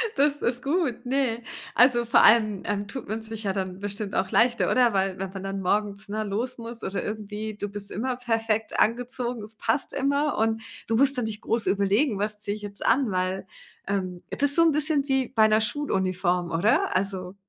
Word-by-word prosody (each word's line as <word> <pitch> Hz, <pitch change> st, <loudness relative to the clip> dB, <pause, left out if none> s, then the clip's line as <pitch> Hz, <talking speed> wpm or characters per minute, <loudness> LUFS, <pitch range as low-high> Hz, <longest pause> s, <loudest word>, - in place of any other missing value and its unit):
Das 290 Hz, +1 st, +2 dB
ist 245 Hz, +1 st, -1 dB
gut, 285 Hz, -5 st, -1 dB
ne? 250 Hz, -3 st, 0 dB, 0.3 s
Also 240 Hz, -1 st, +5 dB
vor 235 Hz, -, +5 dB
allem, 215 Hz, -3 st, +5 dB
ähm, 205 Hz, 0 st, -2 dB
tut 260 Hz, 0 st, -7 dB
man 220 Hz, +1 st, -3 dB
sich 220 Hz, 0 st, -7 dB
ja 195 Hz, -2 st, -1 dB
dann 185 Hz, -1 st, -4 dB
bestimmt 205 Hz, 0 st, -4 dB
auch 190 Hz, -, 0 dB
leichter, 240 Hz, 0 st, +3 dB
oder? 245 Hz, -3 st, +4 dB
Weil 190 Hz, -1 st, 0 dB
wenn 195 Hz, -1 st, -4 dB
man 195 Hz, -1 st, -6 dB
dann 195 Hz, 0 st, -4 dB
morgens, 205 Hz, +2 st, -1 dB
ne, 215 Hz, +1 st, -2 dB
los 225 Hz, +5 st, -3 dB
muss 230 Hz, 0 st, -8 dB
oder 195 Hz, +1 st, -3 dB
irgendwie 215 Hz, 0 st, -5 dB
du 205 Hz, -, -4 dB
bist 205 Hz, 0 st, -1 dB
immer 250 Hz, +5 st, -2 dB
perfekt 225 Hz, -2 st, -1 dB
angezogen, 245 Hz, +1 st, 0 dB
es 215 Hz, +1 st, -7 dB
passt 270 Hz, -, -1 dB
immer 280 Hz, +2 st, 0 dB
und 225 Hz, 0 st, +1 dB, 0.3 s
du 225 Hz, -, +1 dB
musst 275 Hz, +2 st, +4 dB
dann 245 Hz, -, 0 dB
nicht 215 Hz, 0 st, -5 dB
groß 225 Hz, -1 st, -1 dB
überlegen: 200 Hz, +4 st, +2 dB
„Was 210 Hz, +1 st, -2 dB
ziehe 205 Hz, 0 st, -3 dB
ich 215 Hz, -, -10 dB
jetzt 200 Hz, -1 st, -7 dB
an“, 250 Hz, -2 st, +3 dB
weil, 185 Hz, +1 st, -1 dB, 0.4 s
ähm, 185 Hz, -3 st, -2 dB
das -, -, -3 dB
ist 285 Hz, 0 st, +5 dB
so 335 Hz, -, +6 dB
'n 330 Hz, -, +5 dB
bisschen 300 Hz, -1 st, +2 dB
wie 265 Hz, -2 st, +1 dB
bei 220 Hz, -1 st, +4 dB
'ner 215 Hz, 0 st, +3 dB
Schuluniform, 185 Hz, -, 0 dB
oder? 180 Hz, +4 st, +2 dB
Also, 190 Hz, -1 st, -2 dB
220 Hz, 205 wpm, -26 LUFS, 200-245 Hz, 0.4 s, so